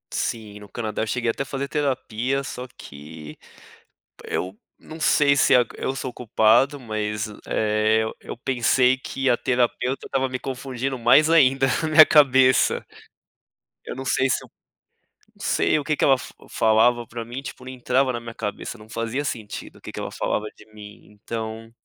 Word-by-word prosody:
Sim, 105 Hz, -3 st, -3 dB
no 100 Hz, -1 st, -13 dB
Canadá 110 Hz, 0 st, -4 dB
eu 110 Hz, -, -1 dB
cheguei 120 Hz, 0 st, 0 dB
até 135 Hz, -, -4 dB
fazer 135 Hz, 0 st, -4 dB
terapia, 135 Hz, -2 st, -1 dB
só 125 Hz, -1 st, -7 dB
que 75 Hz, +1 st, -11 dB, 0.9 s
Eu 95 Hz, +2 st, -4 dB, 0.2 s
não 160 Hz, +1 st, -11 dB
sei 145 Hz, -2 st, +4 dB
se, 140 Hz, -, +4 dB
ah, 125 Hz, -1 st, +5 dB
eu 135 Hz, -, -3 dB
sou 130 Hz, -2 st, -5 dB
culpado 120 Hz, +5 st, +2 dB
mas, 110 Hz, -2 st, -3 dB, 0.2 s
eh, 110 Hz, +1 st, +1 dB, 0.2 s
eu -, -, -8 dB
pensei 125 Hz, +1 st, +2 dB
que 135 Hz, +1 st, -4 dB
a 120 Hz, -, +4 dB
terapeuta 125 Hz, +1 st, -1 dB
estava 135 Hz, 0 st, -1 dB
me 130 Hz, -, -3 dB
confundindo 130 Hz, 0 st, -4 dB
mais 125 Hz, +7 st, +5 dB
ainda, 135 Hz, -4 st, +5 dB, 0.2 s
minha 155 Hz, 0 st, +9 dB
cabeça 130 Hz, -3 st, +4 dB, 1.0 s
Eu -, -, -6 dB
não 135 Hz, -, -7 dB
sei, 135 Hz, 0 st, +1 dB
se -, -, 0 dB
eu -, -, -15 dB, 0.9 s
não -, -, -11 dB
sei -, -, +2 dB
o 145 Hz, -, -5 dB
que 155 Hz, 0 st, 0 dB
que -, -, +1 dB
ela 135 Hz, -, +5 dB, 0.3 s
falava 115 Hz, +2 st, +3 dB
pra 115 Hz, 0 st, -7 dB
mim, 120 Hz, +4 st, -7 dB
tipo, 130 Hz, -, -9 dB
não 130 Hz, -, -8 dB
entrava 130 Hz, +1 st, +1 dB
na 120 Hz, -, -4 dB
minha 115 Hz, 0 st, -9 dB
cabeça, 105 Hz, +2 st, -5 dB
não 105 Hz, 0 st, -15 dB
fazia 115 Hz, +5 st, -3 dB
sentido 110 Hz, -6 st, -6 dB
o -, -, -22 dB
que -, -, -9 dB
que -, -, -6 dB
ela -, -, -5 dB
falava 105 Hz, -, -2 dB
de 105 Hz, -, -17 dB
mim. 105 Hz, -1 st, -12 dB
Então, 110 Hz, +1 st, -6 dB
125 Hz, 175 wpm, -23 LUFS, 110-135 Hz, 1.0 s, minha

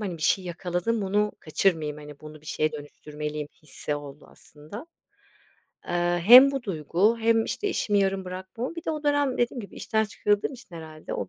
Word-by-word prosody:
hani, 190 Hz, -5 st, -3 dB
bir 155 Hz, -, -9 dB
şey 190 Hz, -, +2 dB
yakaladım 180 Hz, +5 st, -2 dB
bunu 205 Hz, +2 st, +1 dB
kaçırmayayım, 155 Hz, -2 st, 0 dB
hani, 150 Hz, -1 st, -11 dB
bunu 155 Hz, 0 st, -11 dB
bir 155 Hz, -, -19 dB
şeye 155 Hz, 0 st, 0 dB
dönüştürmeliyim 150 Hz, 0 st, -6 dB
hissi 150 Hz, 0 st, -4 dB
oldu 145 Hz, 0 st, -9 dB
aslında. 155 Hz, -, -12 dB, 1.0 s
Eee, 175 Hz, 0 st, 0 dB
hem 250 Hz, +6 st, +10 dB
bu 275 Hz, -2 st, -3 dB
duygu 190 Hz, -, +1 dB
hem, 225 Hz, 0 st, +3 dB
işte, 415 Hz, -, -2 dB
işimi 205 Hz, -, +1 dB
yarım 195 Hz, -1 st, +1 dB
bırakmam 190 Hz, -, -6 dB
bir 335 Hz, -, -7 dB
de -, -, -1 dB
o 305 Hz, -1 st, -4 dB
dönem 290 Hz, -3 st, +1 dB
dediğim 240 Hz, +1 st, 0 dB
gibi 200 Hz, -, -10 dB
işten 220 Hz, -1 st, 0 dB
çıkarıldığım 205 Hz, +2 st, 0 dB
için 245 Hz, -8 st, -13 dB
herhâlde 155 Hz, -1 st, -8 dB
o -, -, -4 dB
185 Hz, 180 wpm, -26 LUFS, 155-225 Hz, 1.0 s, hem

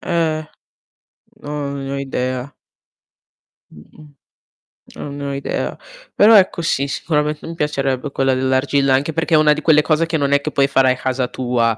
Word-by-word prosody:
Eh, 155 Hz, -2 st, -1 dB, 0.9 s
no, 150 Hz, 0 st, -5 dB
non 140 Hz, -1 st, -5 dB
ne 135 Hz, -, -5 dB
ho -, -, -2 dB
idea. 130 Hz, -1 st, -3 dB, 1.2 s
Mh-mh. 145 Hz, -, -17 dB, 0.8 s
Non 140 Hz, -1 st, -7 dB
ne 140 Hz, -, -5 dB
ho 140 Hz, -, -3 dB
idea. 140 Hz, 0 st, -3 dB, 0.4 s
Però 215 Hz, +2 st, +6 dB
ecco 185 Hz, -3 st, +2 dB
sì 140 Hz, -4 st, 0 dB
sicurament 150 Hz, +1 st, -2 dB
mi 165 Hz, -, -7 dB
piacerebbe 140 Hz, -3 st, -2 dB
quella 135 Hz, -1 st, +1 dB
dell'argilla, 130 Hz, +1 st, +1 dB
anche 140 Hz, +4 st, +1 dB
perché 165 Hz, +1 st, -2 dB
è -, -, +7 dB
una 155 Hz, 0 st, +4 dB
di 150 Hz, +1 st, 0 dB
quelle 155 Hz, -2 st, +5 dB
cose 155 Hz, +1 st, +1 dB
che 165 Hz, 0 st, -3 dB
non 140 Hz, -2 st, 0 dB
è 140 Hz, -, +4 dB
che 155 Hz, +2 st, -5 dB
puoi 140 Hz, -1 st, +2 dB
fare 135 Hz, -2 st, +3 dB
a 130 Hz, -, -11 dB
casa 130 Hz, -1 st, -1 dB
tua, 120 Hz, -3 st, -1 dB
140 Hz, 180 wpm, -18 LUFS, 130-155 Hz, 1.2 s, è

